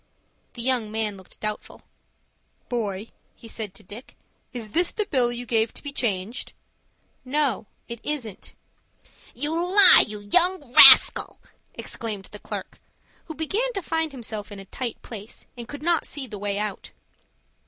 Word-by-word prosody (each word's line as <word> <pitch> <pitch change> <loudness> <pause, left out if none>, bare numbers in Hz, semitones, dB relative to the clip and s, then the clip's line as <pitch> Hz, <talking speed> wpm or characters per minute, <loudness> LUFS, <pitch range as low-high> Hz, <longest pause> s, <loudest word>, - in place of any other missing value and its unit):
The 235 - -6
young 245 -4 0
man 215 -2 -2
looked 190 -1 -15
doubtful. 215 0 -6 0.9
"Boy," 215 -3 -3 0.3
he 230 - -14
said 215 -3 -6
to - - -11
Dick, 210 +7 -12 0.4
"is 230 -4 -7
this 345 +6 +1
the 425 - -2
bill 250 -8 +1
you 240 0 -6
gave 225 -1 +1
to - - -10
be 285 -1 -6
changed?" 220 -1 -2 0.7
"No, 270 -4 -1 0.2
it 235 -1 -7
isn't." 245 -10 -5 0.8
"You 295 +5 -3
lie, 365 +4 +8
you 210 -1 -7
young 330 - +1
rascal!" - - +8 0.4
exclaimed 210 -4 -5
the 210 - -10
clerk, - - -7 0.5
who 315 - -8
began 410 +11 -1
to 395 - -3
find 325 -2 -1
himself 220 -5 -7
in 205 - -8
a 195 - -10
tight 245 +4 -5
place, 215 -2 -10
and 240 -2 -9
could 285 +3 -9
not 340 -1 +1
see 285 -3 -5
the 210 -5 -9
way 200 0 -2
out. 210 -1 -4
235 Hz, 155 wpm, -24 LUFS, 210-295 Hz, 0.9 s, lie